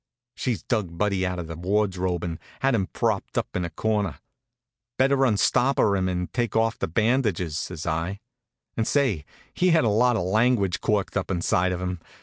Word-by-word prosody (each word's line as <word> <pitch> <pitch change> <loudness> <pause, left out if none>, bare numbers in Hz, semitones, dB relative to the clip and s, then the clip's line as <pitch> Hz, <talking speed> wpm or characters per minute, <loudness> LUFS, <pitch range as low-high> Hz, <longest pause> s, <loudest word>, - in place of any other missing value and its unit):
She'd 115 - -3
dug 95 -8 -1
Buddy 100 -2 +1
out 90 0 -3
of 90 - -4
the 80 0 -7
wardrobe 90 -1 0
and 85 -2 -4 0.2
had 135 0 +3
him 95 -5 +1
propped - - -2
up - - -2
in 90 - 0
a 85 - -3
corner. 105 -6 -1 0.8
"Better 135 +1 +4
unstopper 120 0 +3
him 95 -1 0
and 90 0 -3
take 120 -3 -1
off 115 0 +1
the - - -1
bandages," 105 - +1
says 85 -1 -4
I. 85 +5 -2 0.6
And 110 - -1
say, 125 - +1 0.3
he 185 - +2
had 165 -6 +4
a 115 - +3
lot 120 +3 +3
of 110 - 0
language 100 -1 +2
corked 105 -2 0
up 100 - -1
inside 90 0 +1
of 90 0 -3
him. 90 -2 -3
100 Hz, 185 wpm, -25 LUFS, 90-115 Hz, 0.8 s, Better